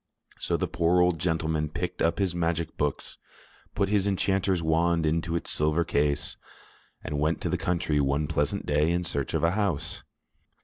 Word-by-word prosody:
So - - 0
the - - -1
poor 85 +1 +2
old 90 -2 +3
gentleman 80 -2 0
packed 75 - -4
up 85 - +2
his 95 -3 0
magic 85 -1 -1
books, 75 -1 -3 0.6
put 100 -1 +1
his 100 -1 +2
enchanter's 95 -2 +1
wand 85 +1 +2
into 80 +2 0
its 85 - -2
silver 75 +3 +2
case, 75 -3 0 0.7
and 75 0 -3
went 80 +2 +1
to - - -1
the - - +1
country 85 -4 0
one 70 +2 +1
pleasant 75 +5 -1
day 75 +2 +2
in 85 +1 +1
search 70 -5 -3
of - - 0
a 85 - +4
house. 95 -6 -1
85 Hz, 175 wpm, -27 LUFS, 75-90 Hz, 0.7 s, a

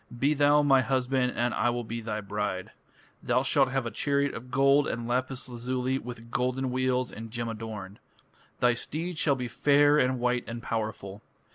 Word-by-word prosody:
Be 140 +5 +2
thou 145 0 +4
my 135 -2 +5
husband 130 -1 0
and 120 0 0
I 120 - +1
will 120 0 -2
be 115 +1 -5
thy 110 -1 -3
bride. 100 -2 -3 0.5
Thou 125 +2 +1
shalt 135 -1 +3
have 135 -1 -1
a 115 - -3
chariot 140 0 0
of 125 +2 -8
gold 140 +2 +4
and 115 0 -3
lapis 130 +1 -2
lazuli 125 +2 -2
with 115 -1 -9
golden 130 +1 -1
wheels 130 0 0
and 115 +1 -8
gem 120 +1 -3
adorned. 105 -3 -7 0.6
Thy 125 0 +5
steeds 160 +7 -4
shall 140 -3 +3
be 125 -2 -4
fair 145 +4 +4
and 130 -1 +1
white 125 0 +1
and 115 +1 -6
powerful. 110 -3 -4
125 Hz, 180 wpm, -28 LUFS, 115-135 Hz, 0.6 s, my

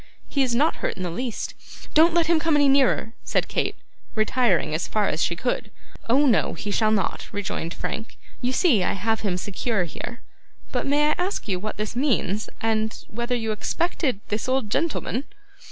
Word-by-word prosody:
'He 280 - 0
is 250 -3 +2
not 295 +6 +3
hurt - - -2
in 185 - -4
the 175 - -2
least.' 235 +6 -3 0.4
'Don't 325 +2 +6
let 340 -1 +4
him 330 0 +3
come 325 -1 +2
any 290 -1 +5
nearer,' 270 -4 +3
said - - 0
Kate, - - -1 0.4
retiring 215 -7 +2
as 155 - -1
far 210 -2 +1
as 155 - -1
she 170 - +1
could. 245 +8 -2 0.4
'Oh, 275 +5 +5
no, 240 -6 +3
he 205 - -4
shall 215 +1 +3
not,' 205 -4 0
rejoined 185 -4 -3
Frank. 225 +1 -5 0.2
'You 250 - +1
see 260 - +4
I - - +1
have 220 +3 0
him 190 -4 -1
secure 205 +2 -1
here. 235 +8 -7 0.5
But - - -1
may 295 +2 +3
I - - +1
ask 365 - -1
you 185 -3 0
what 215 +3 -5
this 215 +2 -3
means, 230 -6 0
and 220 -1 0
whether 240 +3 -2
you 225 -2 -1
expected 260 - -1
this 210 +4 -2
old 260 -5 0
gentleman? 295 -3 -1
230 Hz, 190 wpm, -24 LUFS, 205-275 Hz, 0.5 s, Don't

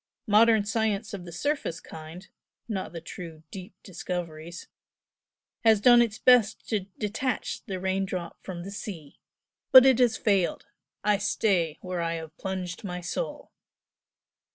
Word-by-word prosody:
Modern 220 0 +5
science 220 -1 -1
of 185 -3 -6
the 170 - -9
surface 275 - -2
kind 160 +4 -10 0.4
(not 200 -5 -4
the 165 -1 -7
true 165 -4 -9
deep 190 +2 -9
discoveries) 170 -3 -6 1.0
has 220 -2 +5
done 240 +2 +7
its 225 -2 0
best 245 -4 +4
to 205 -4 -1
detach 225 +4 -2
the 190 -2 -4
rain 190 +1 0
drop 180 -3 -6
from 175 -2 -7
the 195 - -7
sea! 185 -8 -8 0.5
but 260 0 +10
it 260 -2 +5
has 240 -3 +3
failed. 195 -5 +1 0.4
I 210 -1 +2
stay 180 -6 +1
where 180 -2 -3
I 165 0 -1
have 160 -1 -8
plunged 185 -1 -4
my 180 -3 -4
soul!" 180 - -5
195 Hz, 145 wpm, -27 LUFS, 175-220 Hz, 1.0 s, but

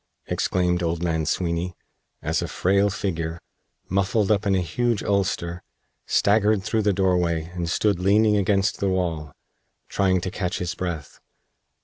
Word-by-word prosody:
exclaimed 90 -1 0
old 85 0 -1
man 80 -3 0
Sweeny, 85 +1 -1 0.5
as 80 +4 0
a 85 - -2
frail 95 +7 +2
figure, 85 -4 -3 0.5
muffled 100 +2 +1
up 105 0 +2
in 100 - +3
a - - +2
huge 115 +6 -1
ulster, 90 -3 -1 0.5
staggered 105 -1 +3
through 110 +1 0
the 105 -1 +2
doorway 90 -3 +1
and 85 -2 -3
stood 100 +1 +1
leaning 105 +3 +4
against 100 0 +1
the 100 - +1
wall, 85 -5 -2 0.6
trying 95 -2 +2
to 95 +1 -4
catch 90 -1 -2
his 90 -1 -3
breath. 85 -5 -5
95 Hz, 145 wpm, -24 LUFS, 85-100 Hz, 0.6 s, leaning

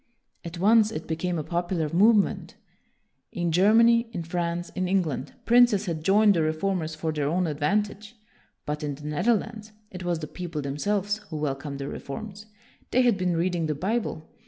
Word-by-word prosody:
At 170 0 -7
once, 215 +4 +4
it 160 - -5
became 170 +2 -2
a 155 - -2
popular 175 -1 -1
move 205 +8 +5
ment. 205 - -1 0.8
In 175 -1 -2
Germany, 230 +6 +4
in 170 - -4
France, 170 +1 -3
in 185 -1 -2
Eng 190 0 +2
land, 155 -5 -5
princes 240 -4 +5
had 165 -4 -4
joined 205 +3 +5
the 170 - +1
reformers 160 +1 -1
for 160 0 -2
their 150 -2 -1
own 180 +3 +1
advantage; 205 +8 -2 0.5
but 150 +1 -3
in 145 -2 -3
the 150 +1 -12
Nether 180 +11 +2
lands, 215 0 -6 0.2
it 185 -1 -7
was 175 -1 0
the 155 - -5
people 165 -1 -6
themselves 200 +9 -1
who 155 - -5
welcomed 140 -1 -3
the 140 0 -5
reforms. 205 +11 -7 0.4
They 255 - +3
had 240 -3 +4
been 180 -3 -1
reading 170 -1 0
the 150 - -1
Bible. 190 -2 -2
175 Hz, 180 wpm, -26 LUFS, 155-205 Hz, 0.8 s, move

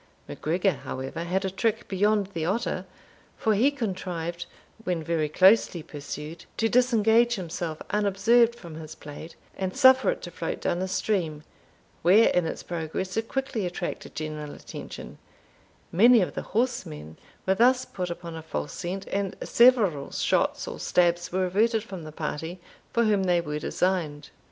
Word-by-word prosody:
MacGregor, 180 +5 0
however, 135 +5 -5
had 190 +3 0
a 190 - -1
trick 225 +4 -1
beyond 205 +1 +1
the 165 - -2
otter; 190 0 -1 0.5
for 220 - +2
he 230 +7 +4
contrived, 180 - -4 0.4
when 180 -5 -1
very 155 -2 0
closely 185 0 +4
pursued, 150 +2 -8
to 225 - +2
disengage 235 0 +4
himself 170 -4 -4
unobserved 210 +4 +3
from 170 -9 -11
his 160 -1 -8
plaid, 150 +3 -10 0.2
and 190 -1 -3
suffer 260 - +6
it - - -2
to - - -6
float - - -4
down 175 - -1
the 190 - -1
stream, 175 -6 -1 0.6
where 200 +7 +6
in 175 -2 +1
its - - -5
progress 175 +2 -4
it 225 +1 -1
quickly 270 -5 -2
attracted 180 0 -5
general 155 -1 -5
attention; - - -9 0.7
many 230 +7 +7
of 180 - -1
the - - -3 0.2
horsemen 80 - -2 0.3
were 190 - +3
thus 250 +5 +4
put 180 -2 -4
upon 170 -1 -6
a 160 - -6
false 75 - -4
scent, 190 +3 -4
and 195 -1 -2
several 220 - +4
shots - - 0
or - - -6
stabs 175 -1 +2
were 185 +1 +1
averted 220 +4 +2
from 190 -5 -8
the 155 - -8
party 160 +3 -4 0.3
for 235 - +2
whom 205 -3 +2
they 175 -1 +3
were 150 -2 -3
designed. 160 -4 -1
185 Hz, 160 wpm, -26 LUFS, 165-220 Hz, 0.7 s, many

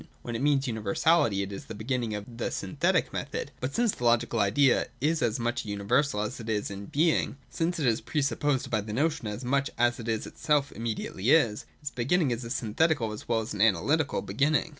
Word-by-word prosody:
When 120 - -4
it 115 - -2
means 140 -1 +2
universality, 110 +1 +2
it 100 - -6
is 100 - -7
the 110 - -8
beginning 115 0 -2
of 105 -1 -5
the - - -1
synthetic - - 0
method. - - -4
But 130 +2 -3
since 235 -2 +3
the 125 - -8
Logical 120 -1 +2
Idea 120 +7 +3
is 155 +3 +1
as 115 -1 +1
much 120 +1 -1
a - - -11
universal 105 +4 +1
as 105 +5 -4
it 115 -1 -7
is 105 -2 -1
in 100 0 -7
being 155 -2 +1
— - - -32
since 170 +2 +1
it 145 - 0
is 115 -3 +2
pre 150 -2 -1
supposed 140 -1 0
by 110 -2 +1
the 105 +1 -6
notion 150 -1 0
as 105 +5 -5
much 140 +2 +1
as 120 +1 +2
it 115 - -7
itself 140 +6 0
immediately 110 -1 -3
is, 115 -9 +3 0.2
its 145 - -3
beginning 140 +4 +1
is 120 +1 -2
a 115 - -6
synthetical 120 +1 +1
as 105 - -8
well 115 -1 +2
as 110 - -5
an 100 - -3
analytical 140 +8 +2
beginning. 150 +4 +1
120 Hz, 220 wpm, -28 LUFS, 110-145 Hz, 0.2 s, since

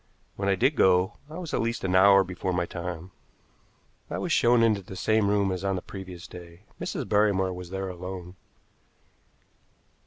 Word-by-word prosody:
When 100 0 -1
I 100 - +3
did 130 +10 +2
go, 95 -1 +3
I 155 - -8
was 175 -4 -6
at - - +1
least 115 +1 -2
an 95 -1 0
hour 100 +1 +7
before 90 0 -3
my 90 0 0
time. 85 +1 -6 1.0
I - - -3
was - - -3
shown 120 0 +4
into 110 -3 +3
the 95 +1 -10
same 110 0 +2
room 100 -1 +2
as 95 0 -4
on 100 -1 0
the 90 - -3
previous 95 -3 -9
day. 85 0 -12 0.2
Mrs. - - -3
Barrymore 100 -3 +2
was 90 -1 -8
there 95 +1 -4
alone. 90 0 -7
95 Hz, 180 wpm, -27 LUFS, 90-105 Hz, 1.0 s, hour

